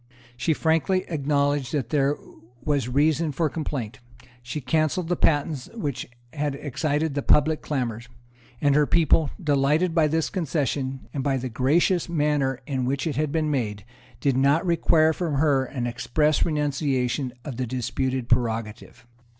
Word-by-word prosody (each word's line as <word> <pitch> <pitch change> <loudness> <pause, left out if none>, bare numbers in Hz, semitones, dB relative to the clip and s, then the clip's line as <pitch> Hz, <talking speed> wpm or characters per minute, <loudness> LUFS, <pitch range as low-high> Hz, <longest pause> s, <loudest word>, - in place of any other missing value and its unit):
She 130 +6 +1
frankly 165 +4 +1
acknowledged 145 -3 0
that 130 -6 -2
there 145 0 +2 0.5
was 140 -5 0
reason 150 +4 +2
for 155 +1 0
complaint; 135 -8 -4 0.4
she 120 +5 -5
cancelled 155 +5 0
the 175 - +2
patents 145 -4 0
which 145 - -4 0.2
had 145 -2 -2
excited 150 +2 -1
the 140 - -1
public 155 +2 +3
clamours; 120 -5 -3 0.5
and 145 +1 +3
her 150 0 +3
people, 160 -2 +3
delighted 150 +2 +2
by 160 -2 +4
this 160 +1 0
concession, 140 - -2
and 135 - -2
by 135 -1 +1
the 130 0 -4
gracious 160 +9 +2
manner 145 -5 0
in 130 -2 -2
which 140 +4 -1
it 160 - -2
had 150 0 0
been 155 -1 0
made, 105 -7 -2 0.3
did 135 +1 +1
not 140 +6 +3
require 165 -2 +3
from 165 -3 -2
her 140 -2 +2
an 130 -2 -4
express 150 +5 +1
renunciation 140 -4 -1
of 135 -5 -6
the 130 -1 -2
disputed 130 +1 -2
prerogative. 115 -2 -2
145 Hz, 150 wpm, -25 LUFS, 130-155 Hz, 0.5 s, by